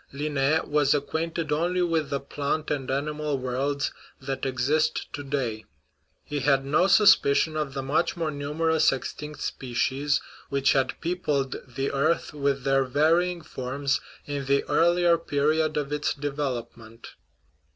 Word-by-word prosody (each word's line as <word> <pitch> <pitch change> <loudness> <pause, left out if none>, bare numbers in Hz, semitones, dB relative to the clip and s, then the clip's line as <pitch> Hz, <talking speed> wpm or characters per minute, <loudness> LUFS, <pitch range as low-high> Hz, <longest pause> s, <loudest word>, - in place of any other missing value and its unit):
Linn6 145 +1 0
was 145 -1 +3
acquainted 160 +3 -2
only 175 +4 +1
with 165 -4 0
the 140 - -1
plant 145 +2 -3
and 135 -3 -2
animal 150 +1 -1
worlds 135 +3 -1 0.3
that 135 0 -3
exist 145 +5 +1
to 145 - -5
day; 125 -6 -3 0.6
he 145 - -3
had 135 -1 +2
no 155 +7 +3
suspicion 175 -7 +5
of 150 -3 -3
the 135 - -2
much 150 +6 0
more 165 -2 -1
numerous 155 +2 +1
extinct 150 +3 -6
spe 125 -2 -5
cies 140 +4 +1 0.3
which 140 0 +2
had 130 -2 0
peopled 150 -6 -1
the 135 +2 -3
earth 155 +5 0
with 140 -2 -1
their 135 0 +3
varying 165 +6 +2
forms 135 -1 -2 0.2
in 145 -1 -4
the 140 +1 +2
earlier 170 0 +3
period 155 0 +1
of 145 -1 -2
its 150 0 -1
development. 120 -5 -5
145 Hz, 140 wpm, -26 LUFS, 135-155 Hz, 0.6 s, suspicion